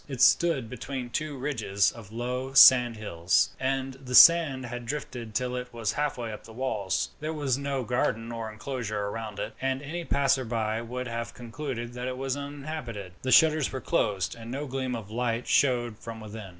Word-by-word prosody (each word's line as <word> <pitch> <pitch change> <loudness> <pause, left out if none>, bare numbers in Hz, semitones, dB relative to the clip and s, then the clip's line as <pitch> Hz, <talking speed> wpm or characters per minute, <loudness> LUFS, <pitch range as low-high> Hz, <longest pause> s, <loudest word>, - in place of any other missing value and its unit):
It 135 -4 -6
stood 150 -4 +4
between 125 +1 -6
two 155 +1 -3
ridges 110 -8 +1
of 110 -3 -12
low 125 +3 -3
sand 125 -4 +8
hills, 90 -4 +1
and 135 0 -1
the 125 -1 -2
sand 155 -6 +7
had 120 0 -6
drifted 120 -5 -5
till 125 0 -1
it 125 0 -5
was 115 -3 -2
halfway 125 -5 -2
up 105 - -9
the 110 - -13
walls. 105 -8 -1
There 155 +1 -3
was 140 -4 0
no 140 -1 -2
garden 115 -1 -1
or 115 -2 -5
inclosure 110 -3 -4
round 110 -2 -6
it, 110 - -4
and 135 0 0
any 170 +4 -4
passerby 120 -7 0
would 125 +2 -5
have 115 0 -5
concluded 120 -1 -6
that 125 +1 -4
it 130 0 -4
was 135 0 -2
uninhabited. 140 -8 -6
The 130 - -2
shutters 155 +2 +5
were 130 - -4
closed, 100 -5 0
and 115 0 -10
no 140 +4 -3
gleam 130 -2 -3
of 110 -3 -8
light 120 0 -1
showed 120 -5 +2
from 115 -1 -8
within. 110 -2 -8
125 Hz, 185 wpm, -28 LUFS, 115-135 Hz, -, sand